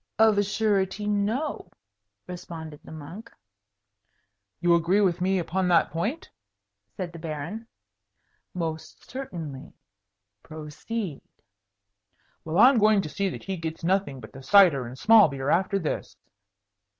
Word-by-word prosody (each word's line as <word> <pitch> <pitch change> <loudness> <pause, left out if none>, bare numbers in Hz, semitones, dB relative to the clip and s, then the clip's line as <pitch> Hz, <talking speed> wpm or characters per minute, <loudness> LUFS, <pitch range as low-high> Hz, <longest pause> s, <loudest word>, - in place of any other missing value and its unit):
"Of 220 -1 +5
a - - +3
surety, 205 -1 0
no!" 210 +8 -1 0.6
responded 165 -4 -8
the - - -13
monk. 165 +9 -10 1.3
"You 175 -1 +3
agree 170 +4 +3
with 185 -4 +1
me 190 +1 +2
upon 180 +2 -1
that 170 -4 +3
point?" 215 - -3 0.6
said 175 - -7
the 170 - -9
Baron. 165 +8 -6 0.9
"Most 160 -2 -5
certainly. 165 - -7 0.7
Proceed." 155 +4 -6 1.2
"Well, 160 +2 -3
I'm 245 +3 +7
going 215 -2 +4
to 155 - -5
see 195 +6 -1
that - - -8
he 195 -1 -4
gets 165 0 -6
nothing 180 -6 0
but 110 - -12
the 135 - -10
cider 160 -7 +5
and 125 +2 -9
small 220 +5 +7
beer 135 0 -2
after 190 +3 +2
this." 165 -6 -4
180 Hz, 130 wpm, -26 LUFS, 160-205 Hz, 1.3 s, I'm